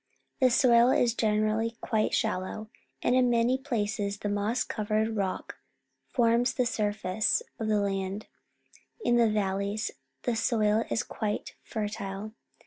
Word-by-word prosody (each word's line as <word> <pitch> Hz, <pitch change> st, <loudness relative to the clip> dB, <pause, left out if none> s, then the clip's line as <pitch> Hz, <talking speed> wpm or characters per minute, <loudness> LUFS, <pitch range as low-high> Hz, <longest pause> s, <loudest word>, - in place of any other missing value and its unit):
The 260 Hz, -2 st, +5 dB
soil 245 Hz, -1 st, +5 dB
is 240 Hz, -3 st, +3 dB
generally 220 Hz, +1 st, 0 dB
quite 215 Hz, -1 st, 0 dB
shallow, 215 Hz, 0 st, -2 dB, 0.3 s
and 245 Hz, -, +3 dB
in 255 Hz, -1 st, +4 dB
many 240 Hz, +1 st, +3 dB
places 210 Hz, -6 st, -2 dB
the 205 Hz, -, -3 dB
moss 205 Hz, +4 st, 0 dB
covered 215 Hz, +1 st, -1 dB
rock 195 Hz, -3 st, -3 dB, 0.5 s
forms 235 Hz, 0 st, +2 dB
the 250 Hz, -, +2 dB
surface 210 Hz, -3 st, 0 dB, 0.2 s
of 220 Hz, -, -2 dB
the 215 Hz, -1 st, +2 dB
land. 195 Hz, 0 st, -2 dB, 0.8 s
In 240 Hz, -, +4 dB
the 230 Hz, -2 st, +4 dB
valleys 200 Hz, 0 st, -1 dB, 0.3 s
the 240 Hz, -, 0 dB
soil 225 Hz, -1 st, +2 dB
is -, -, 0 dB
quite 210 Hz, -1 st, -4 dB
fertile. 210 Hz, -1 st, -5 dB
215 Hz, 135 wpm, -28 LUFS, 205-235 Hz, 0.8 s, The